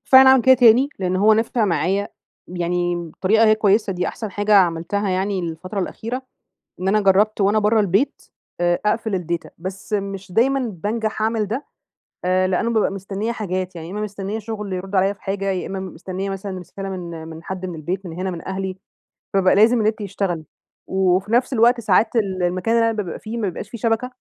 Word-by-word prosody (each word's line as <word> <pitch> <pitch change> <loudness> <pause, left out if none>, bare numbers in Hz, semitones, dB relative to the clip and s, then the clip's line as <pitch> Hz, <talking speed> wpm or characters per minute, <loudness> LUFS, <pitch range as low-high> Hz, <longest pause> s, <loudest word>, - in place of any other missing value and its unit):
فعلًا 265 0 +9
أعمل 265 -2 +6
كده 260 0 +7
تاني، 245 +2 +6
لأن 185 -1 0
هو 210 +3 +5
نفع 225 +1 +1
معايا، 195 +2 0 0.4
يعني 175 0 -1
الطريقة 185 +6 +1
هي 215 - +6
كويسة 210 -1 +2
دي 180 0 -1
أحسن 220 -3 -6
حاجة 205 +2 +1
عملتها 180 +3 +2
يعني 190 +1 0
الفترة 175 +4 -4
الأخيرة. 235 +7 -4 0.6
إن 185 - -2
أنا 210 +2 +3
جربت 200 +2 +3
وأنا 205 +2 +3
بره 215 +1 +3
البيت، 200 +7 +1 0.4
آآ 175 0 +2
أقفل 220 0 0
الData 170 0 -3
بس 190 +4 -7
مش 195 -2 -3
دايمًا 270 +7 +3 0.2
بانجح 220 0 -2
اعمل 220 -1 +1
ده، 245 +7 -3 0.6
آآ 185 +1 +2
لأنه 210 +6 0
بابقى 215 -3 +2
مستنية 195 +3 -3
حاجات، 185 -4 -3
يعني 165 +1 -7
إما 210 - -4
مستنية 205 0 -4
شغل 210 -3 -5
يردوا 190 +1 -1
عليَّ 195 +2 +2
في 200 - -26
حاجة، 195 0 -3
يا 185 -2 -3
إما 190 0 -4
مستنية 190 +1 -5
مثلًا 195 -1 -5
رسالة 195 +2 -7
من 170 -4 -6
من 160 0 -9
حد 185 0 -5
من 180 - -5
البيت 180 +5 -4
من 165 - -6
هنا 185 +2 -3
من 170 0 -7
أهلي، 190 0 -3 0.6
فبابقى 190 -1 +4
لازم 225 +3 +5
النت 215 +1 0
يشتغل. 195 -5 -3 0.4
وفي 190 +2 +1
نفس 250 +3 +2
الوقت 240 +1 +4
ساعات 220 +3 +2
ال 190 -4 0
المكان 185 +6 +1
اللي 230 0 +2
بابقى 175 - -6
فيه 225 +2 -6
ما 210 -4 0
بيبقاش 175 - -7
في - - -6
شبكة، 230 +2 0
195 Hz, 195 wpm, -21 LUFS, 185-220 Hz, 0.6 s, فعلًا